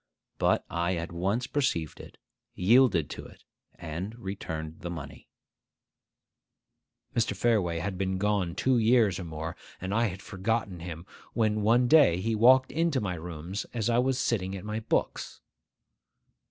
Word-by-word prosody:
But - - +2
I 85 +2 -1
at 85 0 -4
once 100 +8 -1
perceived 125 - -1
it, - - -12 0.4
yielded 100 - +4
to - - -7
it, - - -18 0.3
and 90 +7 -6
returned 80 -7 -6
the 85 - -5
money— 85 -5 -8 1.9
Mr. 115 -3 +1
Fareway 100 -6 +1
had 95 0 -4
been 95 -1 0
gone 100 -4 0
two 130 -2 +2
years 110 -5 +3
or 90 - -5
more, 80 0 -5 0.2
and 95 +2 -4
I 115 +2 +3
had 95 0 -7
forgotten 100 -2 -2
him, 85 0 -7 0.3
when 110 -2 +1
he - - -1
one 120 +4 +4
day 115 - +5
walked 130 +4 +5
into 165 -3 +1
my 100 -6 -2
rooms 85 +3 -6
as 115 0 0
I 115 - +3
was 130 0 +1
sitting 100 -7 -1
at 95 +1 -7
my 105 +1 -3
books. 110 - -2
100 Hz, 155 wpm, -28 LUFS, 85-115 Hz, 1.9 s, day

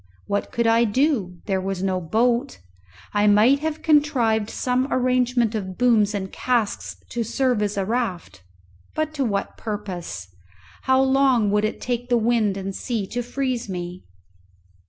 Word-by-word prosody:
What 200 0 -2
could 235 - 0
I 230 +1 +4
do? 220 - 0
There 190 -2 0
was 190 -1 -3
no 185 -1 0
boat. 235 - +1 0.6
I 205 0 +3
might 215 +7 +5
have 315 +1 -3
contrived 255 -9 +2
some 255 +3 -1
arrangement 250 -2 +2
of 190 -4 -4
booms 220 -4 +3
and 190 -1 -4
casks 240 -5 -1
to 235 -1 -2
serve 250 0 0
as 205 -1 -1
a 195 - 0
raft, 220 - -3 0.5
but 310 0 -1
to 285 -3 -1
what 200 -5 -2
purpose? 185 - -5 0.6
How 260 0 +4
long 265 -5 +3
would 210 +1 +2
it 215 - -3
take 245 0 -3
the 240 - +4
wind 225 -3 +1
and 195 0 -5
sea 230 -6 -2
to 245 - -2
freeze 250 -2 -3
me? 180 0 -5
230 Hz, 155 wpm, -23 LUFS, 200-250 Hz, 0.6 s, might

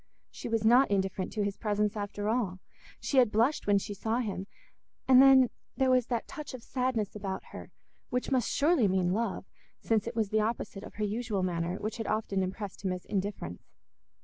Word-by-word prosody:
She - - -7
was 225 -1 0
not 245 +4 +6
indifferent 190 -1 -1
to 210 - 0
his 200 -1 -2
presence 210 0 0
after 205 0 -3
all; 215 -5 0 0.4
she 275 - -1
had 245 -4 +4
blushed 230 +6 +1
when 205 -1 +5
she 200 +1 -3
saw 220 +3 -1
him, 200 -5 -3 0.6
and 260 -1 +8
then 265 -2 +7 0.3
there 265 -1 +3
was 250 -2 +3
that 235 -2 -2
touch 295 -3 -7
of 240 - -10
sadness 250 -6 -1
about 195 -2 -4
her - - -9 0.4
which 250 +2 -2
must 255 -4 +2
surely 295 -6 +3
mean 185 -1 +1
love, 215 -2 -2 0.3
since 225 -1 0
it 235 - -4
was 220 -3 0
the 215 0 +2
opposite 215 -2 -3
of - - -11
her 215 - -2
usual 210 -2 -2
manner, 175 -1 -1
which 215 +3 -4
had 225 - -4
often 210 -3 0
impressed 190 +2 -5
him 190 - 0
as 180 -1 -5
indifference. 195 - -4
215 Hz, 200 wpm, -30 LUFS, 195-240 Hz, 0.6 s, and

